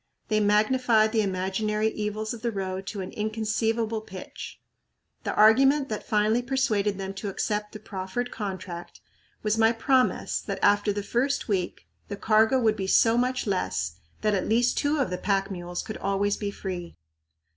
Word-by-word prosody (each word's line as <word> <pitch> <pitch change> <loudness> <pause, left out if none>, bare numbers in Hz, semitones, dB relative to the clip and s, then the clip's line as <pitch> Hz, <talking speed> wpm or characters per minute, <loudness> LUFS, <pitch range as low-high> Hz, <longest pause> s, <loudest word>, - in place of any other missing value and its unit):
They 215 - +3
magnified 215 +2 +3
the 220 -1 +2
imaginary 210 +3 0
evils 215 +1 -3
of 230 - -8
the 235 - 0
road 190 -2 -4
to 200 -1 -4
an 185 - -6
inconceivable 220 +1 -1
pitch. 190 -3 -9 0.7
The - - -1
argument 270 +6 +5
that 215 - -3
finally 215 +2 +2
persuaded 240 -6 0
them 195 0 -4
to 195 +1 -5
accept 210 +1 -2
the 215 - -8
proffered 200 +4 -4
contract 185 -4 -6 0.4
was 215 +1 +1
my 225 0 +5
promise 255 +2 +1
that - - -4
after 205 0 +4
the 205 0 -3
first 255 +6 0
week 190 -5 -2 0.2
the 200 - -5
cargo 220 +5 +4
would 220 -3 +3
be 190 -3 -3
so 225 +3 +5
much 250 +1 0
less 85 - -1 0.2
that 215 -1 +2
at 190 - -1
least 240 +2 +3
two 290 +2 +1
of 265 -10 0
the 180 - -3
pack 195 -1 0
mules 175 -1 -5
could 220 -1 -6
always 200 +1 0
be 205 - -3
free. 180 -4 -6
215 Hz, 170 wpm, -26 LUFS, 195-225 Hz, 0.7 s, argument